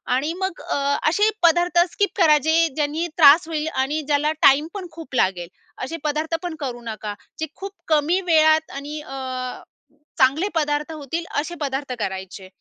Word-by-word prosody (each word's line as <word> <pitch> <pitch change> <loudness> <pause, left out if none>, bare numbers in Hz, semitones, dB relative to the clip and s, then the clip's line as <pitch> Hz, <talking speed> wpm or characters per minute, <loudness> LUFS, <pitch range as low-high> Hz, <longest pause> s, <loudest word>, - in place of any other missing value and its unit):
आणि 295 +6 -1
मग 380 -2 -3
अ, - - -3 0.3
असे 415 +6 +3
पदार्थ 345 +1 +4
स्किप 405 -2 0
करा. 315 -5 +6
जे 320 +3 +2
ज्यांनी 310 +3 -1
त्रास 315 +1 +7
होईल 315 -1 -2
आणि 280 +4 0
ज्याला 295 +1 +2
टाईम 285 +3 +5
पण 380 -3 -6
खूप 315 -4 -10
लागेल. 185 -6 +1 0.4
असे 325 +6 -4
पदार्थ 310 +2 -1
पण 350 -2 -4
करू 250 -4 -5
नका. 215 -2 -5 0.3
जे 315 - -1
खूप 395 0 -7 0.2
कमी 315 +3 +2
वेळात 315 -1 +4
आणि 290 +2 -6
अ, 260 -2 -6 0.6
चांगले 280 +9 +3
पदार्थ 300 0 0
होतील 315 +2 -5
असे 335 +4 -4
पदार्थ 275 -1 -3
करायचे. 190 -1 -5
300 Hz, 160 wpm, -22 LUFS, 270-330 Hz, 0.6 s, त्रास